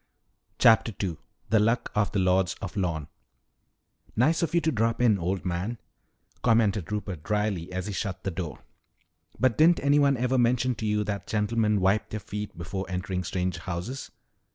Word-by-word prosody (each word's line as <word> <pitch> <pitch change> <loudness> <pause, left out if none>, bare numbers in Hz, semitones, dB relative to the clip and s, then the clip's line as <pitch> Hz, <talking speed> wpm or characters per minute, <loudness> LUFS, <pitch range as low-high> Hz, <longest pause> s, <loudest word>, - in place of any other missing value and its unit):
CHAPTER 115 0 +5
II 85 -5 -2 0.3
THE 110 - +5
LUCK 115 +3 +1
OF 105 -1 +1
THE - - -1
LORDS 95 -1 +2
OF 95 - -6
LORNE 85 -7 -1 1.1
"Nice 150 +9 +3
of 170 0 0
you 170 - +4
to 160 - +1
drop 115 -2 0
in, 115 -5 +4
old 95 +3 -2
man," 90 +6 -2 0.6
commented 105 -6 +2
Rupert 100 -6 -3
dryly 105 -3 -1
as 95 0 -3
he 105 - -4
shut 95 +1 -4
the 95 - -2
door. 85 -2 -6 0.8
"But 130 -1 +2
didn't 165 +2 +6
anyone 140 -1 +4
ever 125 +2 +1
mention 125 +1 +2
to 110 - -3
you 105 0 +1
that 100 -1 -4
gentlemen 105 0 +1
wipe 95 +3 +2
their 110 - -4
feet 105 -1 -6
before 95 +3 -4
entering 90 0 -2
strange 90 0 -2
houses?" 95 +10 -5
105 Hz, 170 wpm, -27 LUFS, 95-115 Hz, 1.1 s, didn't